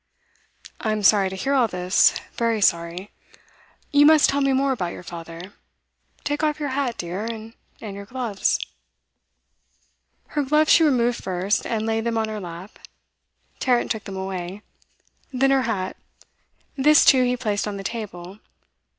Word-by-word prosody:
'I'm 215 -1 -1
sorry 195 -1 +5
to 190 - -7
hear 270 +9 -1
all 255 -4 +3
this 180 -1 +2
very 230 -2 0
sorry. 170 +1 0 0.8
You 290 0 +6
must 310 -1 +6
tell 280 +1 0
me 275 0 +2
more 270 +1 +2
about 185 -9 -2
your - - -10
father. 170 +2 -9 0.7
Take 290 0 -2
off 305 -1 0
your 290 -2 -2
hat, 260 -3 -2
dear, 180 +4 -4
and 225 -1 -7 0.3
your 200 -2 -8
gloves.' 240 -5 -1 1.7
Her 295 - -1
gloves 300 +3 +2
she 330 - +6
removed 245 -5 +1
first, 190 +2 -1
and 220 -2 -2
laid 225 0 -1
them 230 -1 -1
on 220 -1 -1
her 215 -1 -4
lap; 175 +1 -9 0.8
Tarrant 245 -2 +1
took 220 -2 -3
them 195 -2 -7
away. 190 +1 -5 0.7
Then 270 +1 +2
her 260 -3 +2
hat; 190 -4 -2 0.8
this 295 +2 +5
too 260 -1 +6
he 250 0 0
placed 210 -4 -2
on 205 -1 -4
the 195 - -7
table. 195 -4 -6
220 Hz, 155 wpm, -23 LUFS, 190-265 Hz, 1.7 s, You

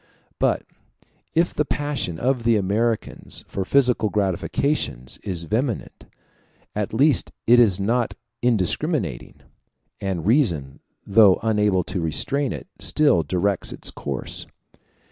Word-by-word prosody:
But - - +1 0.7
if 170 +2 +2
the 150 - +1
passion 145 - -2
of 125 +4 0
the 115 0 +3
Americans 110 +3 -1
for 95 - -3
physical 125 -2 +2
gratifications 95 - -1
is 90 -4 -1
vehement, 115 - -3 0.7
at 105 -1 -2
least 140 +4 +3
it 120 +1 +6
is 100 -6 +4
not 115 +4 0 0.3
indiscriminating; 115 - 0 0.6
and 95 -4 -3
reason, 90 - +1 0.3
though 100 -2 +6
unable 105 -4 +2
to 90 - -4
restrain 125 - -1
it, - - -6
still 145 - +3
directs 90 +5 -1
its - - -4
course. - - -5
105 Hz, 115 wpm, -23 LUFS, 90-125 Hz, 0.7 s, it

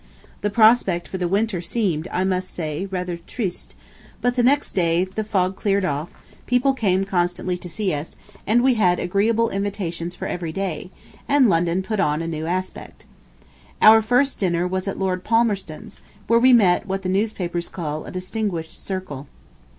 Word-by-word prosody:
The 205 - 0
prospect 215 -5 +4
for 190 - -5
the 180 - 0
winter 200 0 0
seemed, 175 -4 -1
I 185 - 0
must 185 -1 -1
say, 160 +3 -4
rather 180 -2 -3
"triste," 180 +2 -5 0.4
but 245 0 0
the 250 - +2
next 280 +4 +2
day 170 -1 +2
the 190 +4 -4
fog 190 -3 0
cleared 200 -1 0
off, 150 0 -2 0.4
people 250 +2 +3
came 195 -7 +1
constantly 180 -1 -1
to 175 - -8
see 195 +1 -1
us, 150 +2 -5 0.3
and 235 +4 +3
we 260 0 +4
had 180 -6 +3
agreeable 220 +5 +1
invitations 185 -4 -3
for - - -6
every 170 -2 -4
day, 185 -1 -4 0.4
and 280 -3 +4
London 170 +1 +1
put 215 +1 -3
on 150 -3 +1
a - - -4
new 160 -1 -4
aspect. 185 +2 -5 0.7
Out 220 +1 +7
first 250 +5 +2
dinner 175 -2 +1
was 185 +1 -3
at 195 - -3
Lord 185 -1 -1
Palmerston's, 210 -8 -1 0.3
where 230 0 +4
we 255 +2 +6
met 195 -6 +4
what 195 0 -3
the - - -2
newspapers 185 -3 -1
call 155 -3 -5
a - - -8
distinguished 185 -3 -4
circle. 185 -8 -5
190 Hz, 175 wpm, -22 LUFS, 175-215 Hz, 0.7 s, Out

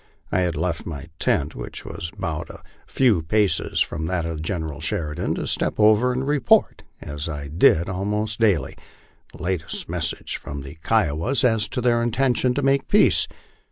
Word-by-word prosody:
I - - +2
had 90 -2 0
left 80 +1 -2
my 75 -4 -6
tent, - - +1
which - - -8
was 85 0 -6
but - - -3
a - - -12 0.2
few 120 -10 +3
paces 100 +5 +1
from 80 +1 -1
that 85 -1 -1
of 80 -2 -4
General 80 -3 -3
Sheridan, 75 -1 -2
to - - -3
step - - -1
over 110 +4 +5
and 130 +2 -2
report, 145 -7 +3 0.2
as 75 +2 -5
I 70 -2 -5
did 80 +1 +4
al 95 0 -3
most 105 +2 -1
daily, 100 - +2 0.6
the - - -11
latest 90 -3 -3
message - - -3
from 70 0 -7
the 70 +4 -10
Kiowas 110 - +1
as 110 -4 +2
to 125 - -3
their 120 -1 +2
intention 125 +1 +1
to 145 - -1
make 135 0 +2
peace. - - +4
90 Hz, 175 wpm, -23 LUFS, 80-115 Hz, 0.6 s, over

